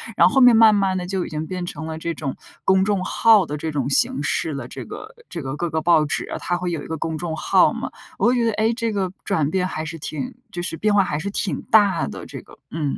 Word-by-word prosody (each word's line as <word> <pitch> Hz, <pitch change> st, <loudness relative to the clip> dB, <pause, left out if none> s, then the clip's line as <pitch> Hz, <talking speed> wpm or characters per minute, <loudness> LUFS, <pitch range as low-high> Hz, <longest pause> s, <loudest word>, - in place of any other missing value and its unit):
然 -, -, +6 dB
后 -, -, -7 dB
后 -, -, +6 dB
面 245 Hz, -2 st, +7 dB
慢 220 Hz, -1 st, +7 dB
慢 195 Hz, -2 st, +1 dB
地 180 Hz, -1 st, -3 dB
就 185 Hz, -1 st, -2 dB
已 -, -, -7 dB
经 155 Hz, +1 st, -4 dB
变 180 Hz, -1 st, -4 dB
成 160 Hz, -1 st, -6 dB
了 160 Hz, -, -5 dB
这 170 Hz, +1 st, -3 dB
种 145 Hz, -4 st, -4 dB, 0.3 s
公 190 Hz, 0 st, +3 dB
众 200 Hz, -2 st, 0 dB
号 215 Hz, -4 st, +4 dB
的 150 Hz, -, -4 dB
这 160 Hz, +2 st, -4 dB
种 140 Hz, -3 st, -2 dB
形 140 Hz, 0 st, +2 dB
式 150 Hz, +1 st, -1 dB
了。 140 Hz, -4 st, -5 dB
这 -, -, -8 dB
个 440 Hz, +3 st, -10 dB
这 165 Hz, -, -5 dB
个 135 Hz, +1 st, -5 dB
各 175 Hz, -, -1 dB
个 160 Hz, 0 st, -1 dB
报 160 Hz, -2 st, +4 dB
纸 145 Hz, -, -2 dB
啊， -, -, -4 dB
它 175 Hz, -, -1 dB
会 180 Hz, 0 st, -3 dB
有 165 Hz, -3 st, -3 dB
一 -, -, -9 dB
个 160 Hz, -, -4 dB
公 160 Hz, +1 st, -3 dB
众 165 Hz, -1 st, -4 dB
号 -, -, +3 dB
嘛， -, -, -4 dB, 0.3 s
我 -, -, +3 dB
会 245 Hz, -, +3 dB
觉 240 Hz, -1 st, +1 dB
得， 225 Hz, -, +2 dB
哎， 220 Hz, +2 st, +1 dB
这 230 Hz, -2 st, -1 dB
个 195 Hz, -3 st, -1 dB
转 160 Hz, -8 st, +1 dB
变 185 Hz, +2 st, 0 dB
还 155 Hz, -4 st, -4 dB
是 160 Hz, +1 st, -6 dB
挺 165 Hz, -, -5 dB, 0.2 s
就 175 Hz, -, -4 dB
是 175 Hz, -2 st, -2 dB
变 210 Hz, +2 st, +1 dB
化 200 Hz, -1 st, +5 dB
还 150 Hz, -, -2 dB
是 195 Hz, +6 st, -4 dB
挺 200 Hz, -, -1 dB
大 205 Hz, -3 st, +4 dB
的， 70 Hz, -, -8 dB
这 -, -, -8 dB
个， -, -, -18 dB
嗯。 160 Hz, -1 st, -4 dB
175 Hz, 305 characters per minute, -22 LUFS, 155-205 Hz, 0.3 s, 面